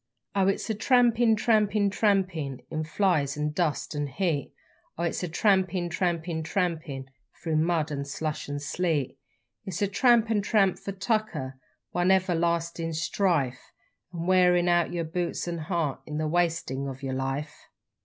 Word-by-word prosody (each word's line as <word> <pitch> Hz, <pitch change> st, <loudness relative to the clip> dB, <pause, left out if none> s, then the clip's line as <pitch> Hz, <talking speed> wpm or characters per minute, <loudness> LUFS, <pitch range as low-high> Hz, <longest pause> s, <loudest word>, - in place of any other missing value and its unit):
_Oh 195 Hz, 0 st, +4 dB
it's -, -, -4 dB, 0.2 s
trampin', 240 Hz, -3 st, +4 dB
trampin', 210 Hz, -2 st, +2 dB
tra 210 Hz, +1 st, +3 dB
a -, -, +3 dB
mpin', 145 Hz, -8 st, -6 dB
in 155 Hz, -1 st, -2 dB
flies 155 Hz, -4 st, +1 dB
an' 150 Hz, 0 st, -1 dB
dust 155 Hz, -2 st, -1 dB
an' 145 Hz, 0 st, -1 dB
heat, 155 Hz, -2 st, -1 dB, 0.5 s
Or 170 Hz, -, -1 dB
it's 170 Hz, -, -2 dB
trampin' 185 Hz, -1 st, +2 dB
trampin' 170 Hz, -2 st, -1 dB
tra 185 Hz, +4 st, 0 dB
a 175 Hz, -1 st, +1 dB
a -, -, -6 dB
mpin' 140 Hz, -4 st, -7 dB, 0.4 s
through 160 Hz, -2 st, 0 dB
mud 160 Hz, -1 st, +1 dB
and 140 Hz, -1 st, -3 dB
slush 150 Hz, +1 st, -4 dB
'n 145 Hz, -, -3 dB
sleet; 150 Hz, -1 st, -1 dB, 0.4 s
It's 190 Hz, +1 st, -3 dB
tramp 235 Hz, 0 st, +4 dB
an' 210 Hz, -2 st, +2 dB
tramp 195 Hz, -2 st, +2 dB
for 200 Hz, -, -5 dB
tucker 185 Hz, -, -2 dB, 0.3 s
one 175 Hz, +1 st, +1 dB
everlastin' 170 Hz, -3 st, +1 dB
strife, 160 Hz, -7 st, 0 dB, 0.4 s
An' 170 Hz, -2 st, -5 dB
wearin' 180 Hz, -1 st, +4 dB
out 175 Hz, -1 st, +3 dB
yer 170 Hz, -1 st, -2 dB
boots 170 Hz, +2 st, -3 dB
an' 170 Hz, -1 st, -3 dB
heart 160 Hz, -3 st, -2 dB
in 150 Hz, -1 st, -4 dB
the 155 Hz, 0 st, -1 dB
wastin' 160 Hz, -5 st, 0 dB
of 135 Hz, 0 st, -7 dB
yer 135 Hz, -1 st, -2 dB
life. 135 Hz, +3 st, -4 dB
170 Hz, 165 wpm, -27 LUFS, 150-190 Hz, 0.5 s, Oh